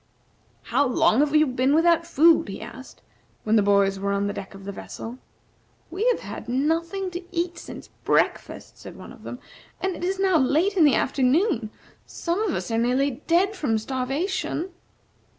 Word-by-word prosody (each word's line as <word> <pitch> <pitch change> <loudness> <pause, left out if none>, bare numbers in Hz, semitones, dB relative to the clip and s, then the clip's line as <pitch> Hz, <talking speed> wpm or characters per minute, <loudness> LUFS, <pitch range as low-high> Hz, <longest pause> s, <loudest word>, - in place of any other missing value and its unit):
"How - - +1
long 245 -1 +3
have 295 +1 +2
you 305 0 +6
been 260 +1 +1
without 335 0 +3
food?" 330 0 +4
he 195 - -6
asked, 260 +2 -11 0.4
when 220 +1 +2
the 215 - +5
boys 200 -1 +2
were 200 0 -1
on 200 0 0
the 205 - -2
deck 195 - -8
of 195 0 -12
the 200 - -4
vessel. 230 +5 -8 0.7
"We 395 +8 -1
have - - +2
had 210 +3 -8
nothing 335 +8 -1
to 355 +1 -6
eat 345 0 -2
since - - -10
breakfast," - - -1
said - - -10
one - - -11
of - - -16
them; - - -7 0.4
"and 380 -2 -2
it - - -8
is 380 +2 -1
now 380 -4 +3
late 315 +9 +2
in 340 -5 +5
the 290 - +5
afternoon. 265 - +1 0.4
Some 345 +4 -2
of 430 -5 0
us - - -4
are 225 - +1
nearly 255 +3 0
dead 375 +5 +2
from 265 - 0
starvation." 280 - -2
295 Hz, 185 wpm, -24 LUFS, 235-350 Hz, 0.7 s, you